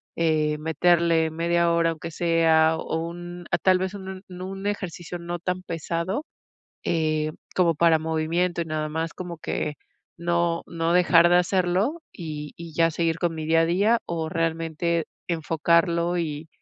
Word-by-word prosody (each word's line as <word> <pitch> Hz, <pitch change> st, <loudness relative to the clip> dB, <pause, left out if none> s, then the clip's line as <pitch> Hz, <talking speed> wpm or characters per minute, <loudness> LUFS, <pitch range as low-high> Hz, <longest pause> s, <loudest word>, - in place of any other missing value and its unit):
eh, 155 Hz, -2 st, +1 dB
meterle 160 Hz, +1 st, +2 dB
media 170 Hz, +1 st, +1 dB
hora, 170 Hz, 0 st, +3 dB
aunque 165 Hz, +1 st, -7 dB
sea, 160 Hz, -1 st, +3 dB
o, 160 Hz, -, -3 dB
un 175 Hz, +1 st, -8 dB
ah, -, -, +3 dB
tal 185 Hz, -1 st, +3 dB
vez, 190 Hz, +1 st, -2 dB
un 190 Hz, -1 st, -7 dB
no 180 Hz, 0 st, -7 dB
un 195 Hz, +1 st, -5 dB
ejercicio 175 Hz, -4 st, -4 dB
no 175 Hz, 0 st, -5 dB
tan 180 Hz, +1 st, -3 dB
pesado, 170 Hz, -, -3 dB, 0.6 s
eh, 155 Hz, -2 st, +1 dB, 0.2 s
como 175 Hz, -2 st, +4 dB
para 165 Hz, 0 st, +4 dB
movimiento 160 Hz, +3 st, 0 dB
y -, -, -2 dB
nada 155 Hz, -1 st, -2 dB
más, 160 Hz, +2 st, -3 dB
como 175 Hz, -2 st, -7 dB
que 150 Hz, -, -2 dB, 0.4 s
no 170 Hz, 0 st, 0 dB
no 165 Hz, 0 st, -1 dB
dejar 175 Hz, -1 st, +6 dB
de 175 Hz, -, +6 dB
hacerlo 185 Hz, -, +1 dB
y 150 Hz, -4 st, -7 dB, 0.2 s
ya 165 Hz, 0 st, +3 dB
seguir 165 Hz, 0 st, 0 dB
con 175 Hz, -2 st, 0 dB
mi 155 Hz, -1 st, -4 dB
día 165 Hz, +1 st, +4 dB
a -, -, +3 dB
día 200 Hz, +7 st, +3 dB
o 165 Hz, -2 st, -3 dB
realmente 165 Hz, 0 st, -1 dB, 0.2 s
enfocarlo 170 Hz, +1 st, +1 dB
y 155 Hz, -2 st, -3 dB
170 Hz, 160 wpm, -25 LUFS, 160-175 Hz, 0.6 s, dejar